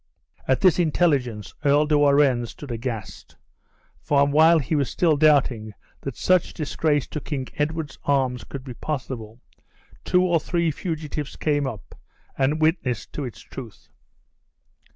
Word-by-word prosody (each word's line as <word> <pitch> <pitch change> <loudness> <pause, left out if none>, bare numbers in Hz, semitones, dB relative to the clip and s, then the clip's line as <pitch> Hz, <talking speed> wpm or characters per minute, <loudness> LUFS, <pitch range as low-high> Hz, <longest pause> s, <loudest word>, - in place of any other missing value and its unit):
At 130 - +2
this 185 -3 +4
intelligence, 140 -10 +1
Earl 145 +1 +4
de 150 0 +2
Warenne 140 -4 +4
stood 135 +3 -10
aghast; 115 -2 -6 0.7
and 140 -1 +3
while 160 +2 +6
he 150 0 -2
was 140 -4 +1
still 165 -4 +2
doubting 130 -8 +2 0.3
that 135 -3 -6
such 185 -2 +2
disgrace 150 -2 0
to 150 - -5
King 135 -4 -4
Edward's 150 -1 -2
arms 130 -5 0
could 135 +4 -8
be 130 -2 -7
possible, 125 -5 -5 0.6
two 180 0 +3
or 175 -2 +2
three 170 0 0
fugitives 150 -3 -5
came 145 -2 0
up, 100 - -8 0.4
and 140 +3 +1
witnessed 155 - 0
to 145 - -4
its 120 - -8
truth. 120 -5 -11
145 Hz, 140 wpm, -24 LUFS, 125-155 Hz, 0.7 s, while